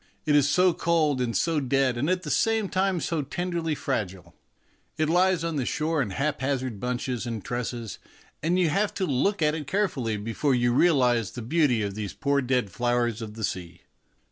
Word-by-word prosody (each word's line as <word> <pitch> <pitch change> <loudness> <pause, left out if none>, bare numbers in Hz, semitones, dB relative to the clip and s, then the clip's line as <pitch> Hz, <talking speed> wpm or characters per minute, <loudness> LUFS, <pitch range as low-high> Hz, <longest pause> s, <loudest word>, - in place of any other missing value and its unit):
It 150 - +3
is 145 -1 +4
so 180 +4 +4
cold 155 -6 +1
and 120 -2 0
so 165 -2 +1
dead 135 -1 +1
and 135 +7 -1
at 185 0 0
the 150 - -4
same 225 -3 +1
time 190 -1 +1
so 165 -3 -1
tenderly 170 +2 -2
fragile. 95 - -4 0.6
It 155 0 +1
lies 180 0 +3
on 165 -2 -2
the 135 - 0
shore 155 0 0
in 120 - -1
haphazard 130 -1 -2
bunches 125 0 -3
and 115 -3 -5
tresses, 120 -2 -4 0.4
and 170 +4 +1
you 180 -3 +3
have 200 +7 0
to 190 - 0
look 165 +6 +1
at 150 0 +3
it 155 -3 -5
care 205 +6 +2
fully 115 - -3
before 115 +6 0
you 120 -1 +2
realize 125 - +3
the 120 - -6
beauty 130 -4 +2
of 100 -1 -3
these 105 -1 -5
poor 140 -2 +1
dead 125 -5 0
flowers 120 0 0
of 110 -1 -7
the 110 - -6
sea. 90 -3 -4
135 Hz, 195 wpm, -26 LUFS, 120-165 Hz, 0.6 s, is